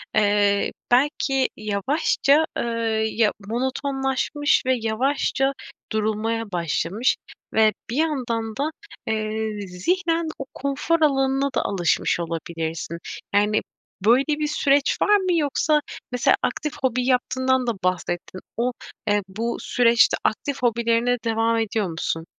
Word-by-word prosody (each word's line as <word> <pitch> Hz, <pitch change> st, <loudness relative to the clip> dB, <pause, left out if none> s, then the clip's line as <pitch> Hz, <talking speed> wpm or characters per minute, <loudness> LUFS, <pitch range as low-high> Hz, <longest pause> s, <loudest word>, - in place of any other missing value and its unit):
eee, 205 Hz, -1 st, +3 dB, 0.2 s
belki 270 Hz, +1 st, +2 dB
yavaşça, 275 Hz, -, +2 dB
eee, -, -, 0 dB, 0.5 s
ya, 220 Hz, -2 st, +2 dB, 0.2 s
monotonlaşmış 270 Hz, +4 st, 0 dB
ve 260 Hz, 0 st, +3 dB
yavaşça 270 Hz, +4 st, 0 dB, 0.4 s
durulmaya 220 Hz, 0 st, -1 dB
başlamış 175 Hz, +6 st, 0 dB, 0.4 s
ve 220 Hz, -1 st, +4 dB, 0.2 s
bir 235 Hz, -, -3 dB
yandan 240 Hz, -8 st, -1 dB
da, 290 Hz, +3 st, 0 dB, 0.4 s
eee, 215 Hz, -1 st, -2 dB
zihnen 330 Hz, -, 0 dB
o 275 Hz, -, -4 dB
konfor 280 Hz, +4 st, -1 dB
alanına 270 Hz, -2 st, +2 dB
da -, -, +2 dB
alışmış 175 Hz, -3 st, +1 dB
olabilirsin. 165 Hz, -1 st, -4 dB, 0.4 s
Yani, 210 Hz, +1 st, +3 dB, 0.4 s
böyle 245 Hz, +5 st, +5 dB
bir 300 Hz, 0 st, 0 dB
süreç 285 Hz, -1 st, +2 dB
var 415 Hz, -, +5 dB
mı? 370 Hz, -2 st, 0 dB
Yoksa 300 Hz, 0 st, +2 dB, 0.3 s
mesela 250 Hz, -1 st, +3 dB
aktif 300 Hz, -2 st, -1 dB
hobi 250 Hz, -1 st, +1 dB
yaptığından 260 Hz, 0 st, +1 dB
da 235 Hz, -, +1 dB
bahsettin. 185 Hz, 0 st, -2 dB, 0.2 s
O, 245 Hz, +2 st, +1 dB, 0.4 s
eee, 205 Hz, 0 st, +3 dB
bu 225 Hz, +5 st, -3 dB
süreçte 235 Hz, -4 st, +3 dB
aktif 275 Hz, +5 st, -1 dB
hobilerine 235 Hz, +1 st, +2 dB
devam 225 Hz, 0 st, +1 dB
ediyor 220 Hz, -2 st, 0 dB
musun? 165 Hz, 0 st, -3 dB
235 Hz, 120 wpm, -23 LUFS, 210-275 Hz, 0.5 s, böyle